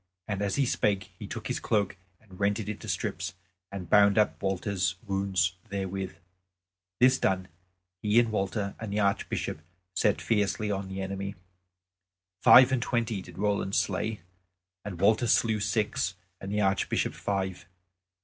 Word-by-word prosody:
And 100 -2 -2
as 100 -1 0
he 140 - +2
spake 100 -5 0
he - - -6
took - - -6
his - - -2
cloak 100 -2 0 0.2
and 95 -5 -16
rent 100 +2 +1
it 105 - -5
into 105 - -5
strips 90 0 -2 0.4
and 95 -3 -6
bound 100 0 +5
up 105 - +2
Walter's 95 -1 0
wounds 95 -3 0
therewith. 95 -1 -3 0.8
This 130 +1 +5
done 95 -1 0 0.5
he 105 +2 +4
and 115 -2 +2
Walter 100 0 -1
and 110 -2 -5
the 105 - 0
Archbishop 100 -5 -1 0.3
set 105 +1 +2
fiercely 105 -1 0
on 100 -1 -2
the 95 0 -4
enemy. 100 +1 -4 1.1
Five 130 0 +8
and 130 -2 +1
twenty 115 -4 -1
did - - -13
Roland 100 -1 0
slay, 105 +2 0 0.6
and 95 -4 -6
Walter 110 +5 +3
slew 110 -1 +3
six, 100 - 0 0.2
and 95 - -6
the 105 0 +1
Archbishop 95 -1 +1
five. 95 -3 -3
100 Hz, 150 wpm, -28 LUFS, 95-105 Hz, 1.1 s, Five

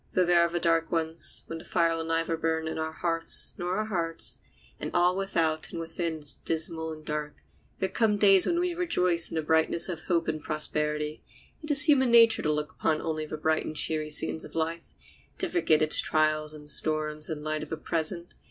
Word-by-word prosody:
Though 185 - +2
there 175 0 +4
are 170 - +2
the 175 +1 -2
dark 165 -1 0
ones, 165 -1 -2
when 165 - -7
the - - -12
fire 165 -2 0
will 165 - -4
neither 165 0 -1
burn 160 0 -2
on 160 - -4
our 160 0 -3
hearths 165 0 0
nor 180 +1 -2
our 215 - -1
hearts, 170 -6 -4 0.4
and - - -4
all 175 +1 +3
without 165 -5 -1
and 170 - -6
within 165 0 -4
is 150 -2 -5
dismal 160 0 +2
and 155 -1 -11
dark, 150 -1 -5 0.3
there 190 - -1
come 210 0 0
days 195 -2 +5
when 345 - 0
we 355 0 -1
rejoice 180 - +2
in - - -7
the 160 - -1
brightness 160 +3 +1
of 165 -3 -6
hope 170 -2 0
and 155 -1 -3
prosperity. 150 0 -3 0.4
It 305 - -7
is 285 -1 +9
human 265 -4 +4
nature 230 -1 +5
to 150 - 0
look 150 0 -3
upon 155 -1 -1
only 155 -1 -4
the 155 - -6
bright 155 +1 0
and 155 - -7
cheery 155 0 0
scenes 155 +1 0
of - - -12
life, 165 +1 -4 0.4
to 370 - -2
forget 250 - +1
its 155 - +6
trials 155 -1 +1
and 150 -1 -10
storms 155 +1 -1
in 160 - -3
the - - -11
light 155 0 -2
of 155 - -8
the 160 - -4
present. 165 +2 -1
165 Hz, 215 wpm, -27 LUFS, 155-175 Hz, 0.4 s, is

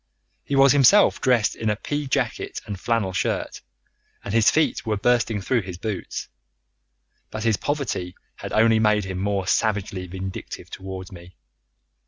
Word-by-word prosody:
He 140 - -2
was 135 0 +6
himself 145 +9 +5
dressed 120 -4 +2
in 110 - -2
a 105 - +1
pea 145 +6 -4
jacket 130 - -2
and 100 -3 -6
flannel 115 -5 0
shirt, - - -2 0.6
and 100 - -5
his 115 -1 +5
feet 160 0 +1
were 110 -2 -1
bursting 120 -1 +1
through 120 +5 +1
his 90 -2 -8
boots. 105 +1 -5 1.0
But 110 0 -5
his 115 -2 +3
poverty 135 -11 -3 0.2
had - - -7
only 110 0 +4
made 105 -2 +2
him 95 -1 -4
more 100 -1 -1
savagely 100 -2 0
vindictive 95 +1 -7
towards 95 -1 -7
me. 90 0 -13
105 Hz, 155 wpm, -23 LUFS, 95-120 Hz, 1.0 s, was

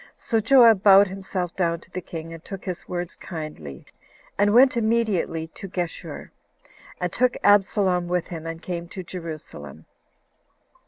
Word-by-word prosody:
So 225 - -1
Joab 230 -3 +6
bowed 200 0 +7
himself 190 -2 -4
down 170 -2 0
to 180 - -18
the 185 - -5
king, 165 -1 -8
and 165 0 -11
took 195 -1 -8
his 180 -3 -5
words 175 -1 -4
kindly, 155 - -8 0.5
and 205 +1 +3
went 255 +4 +6
immediately 220 -8 0
to 195 - -9
Geshur, 175 -2 -5 0.7
and - - -2
took 250 -1 +1
Absalom 195 -3 +3
with 180 -1 -1
him, 165 -2 -7
and 165 +1 -7
came 175 -1 -5
to 185 +2 -8
Jerusalem. 155 - -9
180 Hz, 150 wpm, -24 LUFS, 165-205 Hz, 0.7 s, bowed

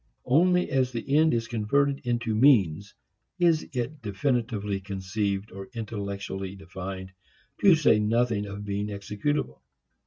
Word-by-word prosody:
Only 180 +7 +3
as 130 -1 +1
the 125 +4 -2
end 160 +1 +5
is 115 0 -1
converted 135 +6 +1
into 120 -2 0
means 105 - +3 0.4
is 170 -3 +2
it 130 +3 -4
definitely 105 -2 -1
conceived, 100 +1 -3
or 95 +3 -9
intellectually 100 -3 -5
defined, 95 0 -7 0.5
to 195 -4 +7
say 150 -9 +4
nothing 110 -1 +1
of 100 +1 -7
being 100 0 -2
executable. 105 - -3
110 Hz, 125 wpm, -27 LUFS, 100-130 Hz, 0.5 s, to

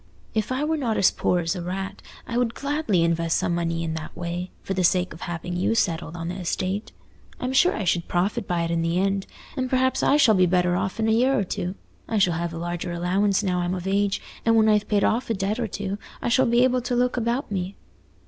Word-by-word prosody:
If 215 +2 -1
I 260 +3 0
were 315 +1 0
not 235 -7 -1
as 190 - +5
poor 180 - +1
as 165 +2 -1
a 180 - -4
rat, 190 +3 -4 0.2
I 235 - -5
would 240 -1 +1
gladly 280 - 0
invest 165 0 +1
some 175 - 0
money 165 -1 -1
in 160 -1 -2
that 160 +1 -7
way, 175 +1 -4
for 195 - -2
the 185 -1 0
sake 180 +1 +2
of 165 - -13
having 175 +1 -4
you 185 +5 +1
settled 170 -5 0
on 165 0 -4
the 180 +2 -4
estate. 185 +3 -2 0.5
I'm 255 +1 -2
sure 355 +7 +4
I 215 - -2
should 175 -1 0
profit 195 +5 0
by 175 -1 0
it 165 - -2
in 165 0 +1
the 165 +1 0
end. 195 +1 0 0.3
And 255 -2 -1
perhaps 260 0 +2
I 290 - +4
shall 245 -7 +6
be 185 -2 +4
better 180 0 +2
off 190 +3 -2
in 220 - +1
a - - +3
year 255 +4 +3
or 205 - +2
two. 185 0 -3 0.3
I 225 - -1
shall 185 -4 +3
have 170 +1 -2
a 165 - -6
larger 175 +1 -3
allowance 185 +4 +1
now 180 -2 0
I'm 175 +1 -1
of 180 -1 -6
age; 200 +1 +1 0.2
and 230 0 +3
when 220 -1 +5
I've 210 -1 +3
paid 205 -2 +2
off 235 +2 +1
a 225 - +1
debt 200 +4 -1
or 235 - 0
two, 200 0 -4 0.2
I - - -2
shall 260 +2 +4
be 235 +1 +4
able 255 0 +2
to 245 0 -2
look 250 +1 +2
about 240 +1 -1
me." 190 0 -3
195 Hz, 255 wpm, -24 LUFS, 175-230 Hz, 0.5 s, shall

